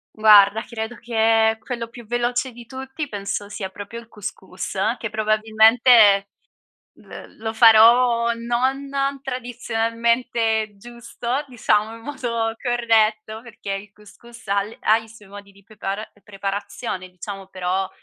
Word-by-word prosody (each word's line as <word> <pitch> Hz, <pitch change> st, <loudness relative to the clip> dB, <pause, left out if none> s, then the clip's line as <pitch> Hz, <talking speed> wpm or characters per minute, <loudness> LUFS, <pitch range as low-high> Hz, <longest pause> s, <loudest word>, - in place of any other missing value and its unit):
Guarda, 210 Hz, 0 st, +6 dB
credo 225 Hz, 0 st, -6 dB
che 225 Hz, -1 st, +2 dB
quello 235 Hz, 0 st, -5 dB
più 235 Hz, 0 st, -13 dB
veloce 240 Hz, +3 st, -1 dB
di 240 Hz, 0 st, -13 dB
tutti 265 Hz, +4 st, -6 dB
penso 205 Hz, -2 st, -4 dB
sia 200 Hz, -1 st, -6 dB
proprio 205 Hz, +4 st, -9 dB
il 230 Hz, -1 st, -11 dB
cous 210 Hz, -3 st, -6 dB
cous, 190 Hz, +1 st, -8 dB, 0.2 s
che 230 Hz, -, -4 dB
probabilmente, 215 Hz, -1 st, +4 dB, 0.7 s
l -, -, -12 dB
lo 220 Hz, 0 st, -4 dB
farò 235 Hz, +1 st, +6 dB
non 250 Hz, +4 st, -1 dB, 0.4 s
tradizionalmente 230 Hz, -2 st, -1 dB
giusto, 240 Hz, +4 st, -5 dB
diciamo 225 Hz, -3 st, 0 dB
in 230 Hz, -, -13 dB
modo 235 Hz, -5 st, -3 dB
corretto, 220 Hz, -3 st, +1 dB
perché 230 Hz, -4 st, -8 dB
il 195 Hz, +1 st, -7 dB
cous 210 Hz, -1 st, -18 dB
cous 235 Hz, -1 st, -15 dB
ha 200 Hz, 0 st, +2 dB
le 210 Hz, +3 st, -9 dB
ha 220 Hz, -, +4 dB
i 225 Hz, 0 st, -9 dB
suoi 215 Hz, -2 st, -16 dB
modi 200 Hz, 0 st, -12 dB
di 200 Hz, 0 st, -22 dB
prepara 205 Hz, +1 st, -6 dB, 0.2 s
preparazione 195 Hz, 0 st, -5 dB
diciamo, 195 Hz, +2 st, -9 dB
però, 185 Hz, 0 st, -2 dB
225 Hz, 135 wpm, -22 LUFS, 205-235 Hz, 0.7 s, Guarda